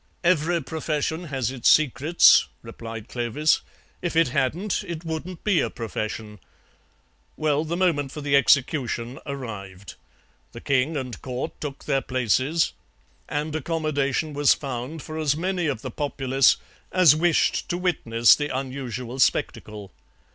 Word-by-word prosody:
"Every 170 Hz, -1 st, +2 dB
profession 160 Hz, +2 st, -2 dB
has 135 Hz, -5 st, -2 dB
its 130 Hz, -3 st, +2 dB
secrets," 155 Hz, +3 st, +5 dB, 0.2 s
replied 115 Hz, -1 st, -8 dB
Clovis; 125 Hz, +6 st, +1 dB, 0.4 s
"if 175 Hz, -2 st, -3 dB
it 165 Hz, -4 st, +4 dB
hadn't 170 Hz, +11 st, -1 dB
it 170 Hz, -1 st, -6 dB
wouldn't 165 Hz, +2 st, -5 dB
be 200 Hz, -5 st, +3 dB
a -, -, 0 dB
profession. 110 Hz, -2 st, -5 dB, 1.0 s
Well, 155 Hz, -1 st, +1 dB
the 165 Hz, +2 st, -3 dB
moment 155 Hz, -7 st, +1 dB
for 150 Hz, -, -7 dB
the 145 Hz, -1 st, +1 dB
execution 130 Hz, -2 st, +2 dB
arrived; 100 Hz, -9 st, -7 dB, 0.6 s
the -, -, -8 dB
king 140 Hz, +3 st, +1 dB
and 125 Hz, -4 st, -5 dB
Court 130 Hz, +3 st, -4 dB
took 140 Hz, -2 st, -6 dB
their 135 Hz, -, +1 dB
places, 130 Hz, +6 st, +1 dB, 0.6 s
and 150 Hz, +1 st, -2 dB
accommodation 155 Hz, -2 st, -1 dB
was 145 Hz, -1 st, +4 dB
found 135 Hz, +3 st, -6 dB
for 155 Hz, 0 st, -6 dB
as 150 Hz, -1 st, +1 dB
many 180 Hz, 0 st, -1 dB
of 130 Hz, -6 st, -3 dB
the 130 Hz, -, -5 dB
populace 135 Hz, -1 st, +2 dB, 0.3 s
as 180 Hz, -5 st, +6 dB
wished 170 Hz, +1 st, +1 dB
to 175 Hz, -, -1 dB
witness 120 Hz, -11 st, +3 dB
the 145 Hz, 0 st, -3 dB
unusual 130 Hz, -2 st, -5 dB
spectacle. 105 Hz, -5 st, 0 dB
140 Hz, 135 wpm, -24 LUFS, 125-160 Hz, 1.0 s, as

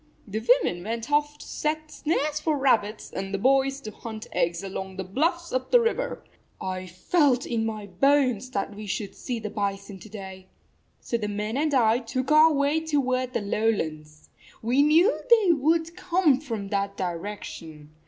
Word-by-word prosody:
The 210 Hz, +2 st, -3 dB, 0.2 s
women 175 Hz, 0 st, -2 dB
went 230 Hz, +5 st, -4 dB
off 295 Hz, 0 st, +1 dB
to -, -, -11 dB
set 310 Hz, 0 st, -3 dB
snares 300 Hz, -1 st, -1 dB
for 305 Hz, -1 st, 0 dB
rabbits, 225 Hz, -6 st, +1 dB
and 195 Hz, 0 st, -4 dB
the 200 Hz, -, -1 dB
boys 270 Hz, +4 st, +2 dB
to 215 Hz, -, -7 dB
hunt 220 Hz, 0 st, -8 dB
eggs 170 Hz, +2 st, 0 dB
along 190 Hz, 0 st, -5 dB
the 190 Hz, -, -4 dB
bluffs 330 Hz, -, -1 dB
up 255 Hz, 0 st, -1 dB
the -, -, +6 dB
river. -, -, -1 dB, 0.4 s
I 185 Hz, 0 st, -4 dB
felt 255 Hz, -, +2 dB
in 225 Hz, -2 st, -1 dB
my 215 Hz, -2 st, -5 dB
bones 255 Hz, +4 st, +2 dB
that 205 Hz, -4 st, -3 dB
we 210 Hz, 0 st, -8 dB
should 200 Hz, +1 st, -3 dB
see 250 Hz, -3 st, -4 dB
the 215 Hz, -2 st, -5 dB
bison 200 Hz, -1 st, -3 dB
to 215 Hz, -, -12 dB
day. 190 Hz, -2 st, -9 dB, 0.5 s
So 235 Hz, -, -1 dB
the 210 Hz, -2 st, -3 dB
men 210 Hz, +2 st, -3 dB
and 295 Hz, +1 st, +1 dB
I 230 Hz, -2 st, +4 dB
took 255 Hz, +3 st, -3 dB
our 310 Hz, +1 st, +7 dB
way 285 Hz, +1 st, +2 dB
toward 255 Hz, -5 st, 0 dB
the -, -, 0 dB
lowlands. 155 Hz, -8 st, -2 dB, 0.3 s
We 245 Hz, +5 st, +3 dB
knew 325 Hz, +9 st, +4 dB
they 440 Hz, -6 st, +6 dB
would 325 Hz, +3 st, +1 dB
come 345 Hz, -7 st, +2 dB
from 225 Hz, -9 st, -5 dB
that 200 Hz, 0 st, -1 dB
direction. 170 Hz, -4 st, -6 dB
235 Hz, 175 wpm, -26 LUFS, 200-295 Hz, 0.5 s, our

